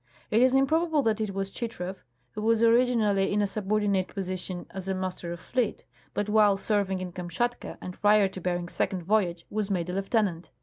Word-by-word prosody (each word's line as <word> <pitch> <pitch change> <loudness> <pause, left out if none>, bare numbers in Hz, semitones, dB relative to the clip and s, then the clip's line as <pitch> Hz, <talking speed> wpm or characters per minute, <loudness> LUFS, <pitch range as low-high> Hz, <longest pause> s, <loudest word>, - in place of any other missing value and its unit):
It 225 - +4
is 255 +1 +5
improbable 310 +2 +3
that 220 -2 +1
it 200 -3 -2
was 195 0 -2
Chitrow, 195 -6 -4 0.4
who 210 - -6
was 225 +1 +3
originally 230 -4 +3
in 205 - +1
a 205 - +3
subordinate 200 -1 0
position 185 -2 -4
as 190 -1 -6
a 190 - 0
master 185 -2 -4
of 170 - -6
fleet, 245 +3 -2 0.3
but 205 - 0
while 210 -2 +4
serving 200 -2 0
in 185 -1 -5
Kamshatka 180 +8 -3
and 180 - -8
prior 210 -1 +5
to 190 -1 -8
Bering's 175 -1 -2
second 185 -3 -1
voyage 180 -3 +1
was 215 -1 -1
made 180 -3 -1
a - - -5
lieutenant. 195 -3 0
200 Hz, 190 wpm, -27 LUFS, 185-220 Hz, 0.4 s, is